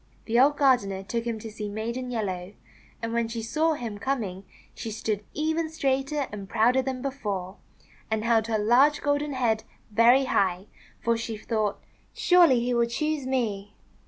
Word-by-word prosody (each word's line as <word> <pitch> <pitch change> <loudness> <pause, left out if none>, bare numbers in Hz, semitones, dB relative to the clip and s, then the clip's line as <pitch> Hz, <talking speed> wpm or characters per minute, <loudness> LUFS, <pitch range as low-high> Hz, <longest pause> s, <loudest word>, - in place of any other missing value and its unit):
The 235 +1 +2
old 285 +3 +5
gardener 205 -9 +2
took 230 +3 -3
him 230 -2 -2
to 220 0 -8
see 210 -1 -5
Maiden 235 +4 -4
Yellow, 195 -5 -3 0.5
and 230 0 -2
when 235 -1 +1
she 230 0 -5
saw 315 +8 +1
him 230 -8 -5
coming 200 -7 -3 0.3
she 230 - -6
stood 215 -1 -2
even 315 +1 0
straighter 280 -1 0
and 200 -2 -7
prouder 235 +4 +3
than 260 -1 -4
before, 205 -9 -4 0.5
and 220 -1 -1
held 225 -1 +2
her 225 -1 +1
large 250 +8 +4
golden 290 0 0
head 230 -4 +1 0.3
very 235 +5 +5
high, 190 -6 +1 0.4
for 235 0 +2
she 225 -1 -4
thought, 215 -1 -2 0.3
"Surely 340 -9 +5
he 245 +1 0
will 235 -1 +2
choose 300 +2 -2
me." 210 -6 -2
235 Hz, 165 wpm, -26 LUFS, 215-265 Hz, 0.5 s, old